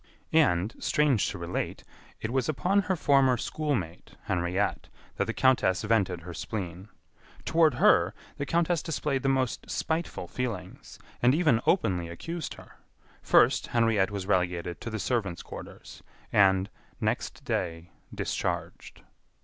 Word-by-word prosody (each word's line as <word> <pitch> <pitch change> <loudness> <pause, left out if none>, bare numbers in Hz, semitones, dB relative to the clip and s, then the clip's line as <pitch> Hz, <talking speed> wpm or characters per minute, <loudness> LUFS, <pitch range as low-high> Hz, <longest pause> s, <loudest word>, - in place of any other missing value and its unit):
And, 110 - +3
strange 145 -8 +2
to 100 - -6
relate, 85 0 -4 0.4
it 110 - -3
was 130 0 0
upon 185 +7 +2
her 190 -1 -1
former 135 -5 +4
schoolmate, 115 - -3
Henriette, 90 +2 -1 0.3
that - - +1
the - - -2
countess 120 -8 +2
vented 100 -6 +1
her 90 +1 -8
spleen. 90 +3 -5 0.6
Toward 160 -5 +4
her, - - +4 0.2
the 140 - -3
countess 170 0 +1
displayed 150 -4 -1
the 135 - +1
most 130 -2 -1
spiteful 160 +1 -2
feelings, 105 -8 -5 0.2
and 125 +3 +5
even 150 -9 +3
openly 90 - +2
accused 165 - -5
her. - - -16 0.4
First, - - +4
Henriette 115 -5 +2
was 100 -2 -4
relegated 90 -3 -1
to 120 - -4
the 110 - -3
servants' 105 -6 -2
quarters, - - -10 0.3
and, 95 -1 +4 0.3
next - - -2
day, 85 0 -3 0.2
discharged. - - -4
110 Hz, 135 wpm, -28 LUFS, 90-140 Hz, 0.6 s, and